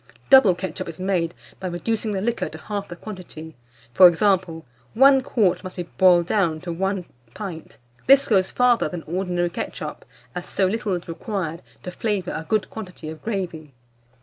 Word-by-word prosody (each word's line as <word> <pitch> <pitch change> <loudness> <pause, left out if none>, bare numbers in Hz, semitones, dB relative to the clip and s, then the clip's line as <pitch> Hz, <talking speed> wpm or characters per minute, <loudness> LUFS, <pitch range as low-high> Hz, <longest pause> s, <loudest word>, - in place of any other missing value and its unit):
Double 240 -9 +8
ketchup 180 -2 -5
is 165 - -9
made 180 -3 -1 0.2
by 190 - -4
reducing 215 +5 -2
the 195 -2 -2
liquor 235 +3 -1
to - - -9
half 205 -1 -5
the 175 - -8
quantity; 170 -5 -9 0.4
for 185 +5 +9
example, 175 -2 +1 0.3
1 270 +2 +6
quart 215 -9 +1
must 185 -1 -8
be 180 - -3
boiled 175 0 +4
down 170 -5 +1
to 175 +1 -6
1 190 +1 -2 0.3
pint. 180 -6 -7 0.3
This 275 +1 +6
goes 190 -4 +3
farther 250 -1 +2
than 175 -3 -6
ordinary 175 0 -1
ketchup, - - -6 0.3
as 175 - -6
so 195 - +1
little 205 0 -1
is 175 - -7
required 170 -2 -4 0.2
to 180 - -5
flavour 200 -2 -2
a 160 - -5
good 215 -2 +1
quantity 180 -7 -8
of 160 0 -9
gravy. 170 - -4
185 Hz, 175 wpm, -23 LUFS, 175-210 Hz, 0.4 s, for